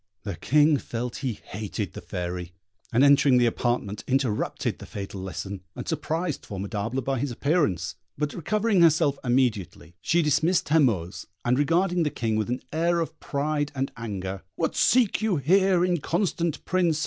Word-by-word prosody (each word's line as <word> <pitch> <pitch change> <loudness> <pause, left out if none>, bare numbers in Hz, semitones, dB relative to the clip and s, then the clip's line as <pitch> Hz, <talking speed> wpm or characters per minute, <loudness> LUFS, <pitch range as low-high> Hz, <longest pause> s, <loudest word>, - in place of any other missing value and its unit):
The 100 -3 -4
King 150 - +4
felt 120 -1 -4
he 130 -4 -2
hated 105 0 -5
the - - -7
Fairy; 90 0 -5 0.4
and 120 +4 +4
entering 140 -2 +6
the 120 - +4
apartment, 115 -3 -1
interrupted 130 -5 -1
the - - -10
fatal 100 -1 -6
lesson, 95 +1 -5
and - - -6
surprised 160 0 -2
Formidable 105 +6 -3
by 135 0 -1
his 140 +2 -1
appearance; 120 - 0 0.2
but 150 -1 -1
recovering 210 +3 +1
herself 155 -4 +4
immediately, 120 -10 0
she 170 +8 +2
dismissed 155 +4 +2
her 160 +2 +5
Moors, 100 - 0 0.2
and 125 +2 +2
regarding 175 +4 +2
the 155 - +2
King 115 -5 -2
with 110 0 -1
an 125 +1 -2
air 170 +2 +2
of 165 - -4
pride 145 0 -1
and 135 0 -2
anger, 100 -5 -5
"What - - -1
seek 240 -5 +3
you 215 -4 +1
here, 180 +5 +3
inconstant 170 -1 -1
Prince?" 175 -4 +1
135 Hz, 160 wpm, -26 LUFS, 110-165 Hz, 0.4 s, entering